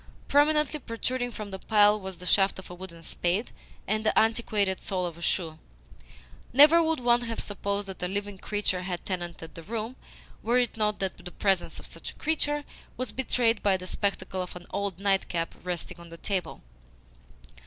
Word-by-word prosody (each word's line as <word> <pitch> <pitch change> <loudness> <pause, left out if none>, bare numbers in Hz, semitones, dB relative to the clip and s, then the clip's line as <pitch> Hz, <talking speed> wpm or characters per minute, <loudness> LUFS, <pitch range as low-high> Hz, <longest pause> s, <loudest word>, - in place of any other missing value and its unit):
Prominently 300 +1 +3
protruding 245 0 -2
from 210 -2 -6
the 190 - -5
pile 210 0 +5
was 190 -1 -6
the 180 - -10
shaft 195 +2 +4
of 190 - -9
a - - -6
wooden 175 -2 -9
spade 180 +7 0 0.3
and 215 +2 0
the 215 - +2
antiquated 215 -4 +2
sole 185 -2 -1
of 170 -2 -4
a 170 - -13
shoe. 165 -2 0 0.9
Never 300 +6 +8
would 320 -2 +2
one 240 0 +4
have 230 -1 -4
supposed 200 0 -2
that 190 -2 -7
a 180 - +1
living 200 +1 -3
creature 205 -3 -1
had 180 -1 -4
tenanted 175 -4 -4
the 165 - -8
room, 225 +6 -4 0.5
were 235 +2 +2
it 245 -2 +1
not 210 -1 +1
that 190 -2 -2
the 180 - -6
presence 190 0 +1
of - - -10
such - - -6
a - - -11
creature 295 -2 0 0.3
was 255 - -3
betrayed 240 -3 +2
by 195 -2 +3
the 185 - -8
spectacle 190 -1 -2
of 180 - -5
an 175 0 -9
old 200 -3 -2
nightcap 190 -4 +1
resting 180 0 -4
on 170 0 -11
the 165 - -9
table. 190 0 -2
200 Hz, 185 wpm, -28 LUFS, 180-230 Hz, 0.9 s, Never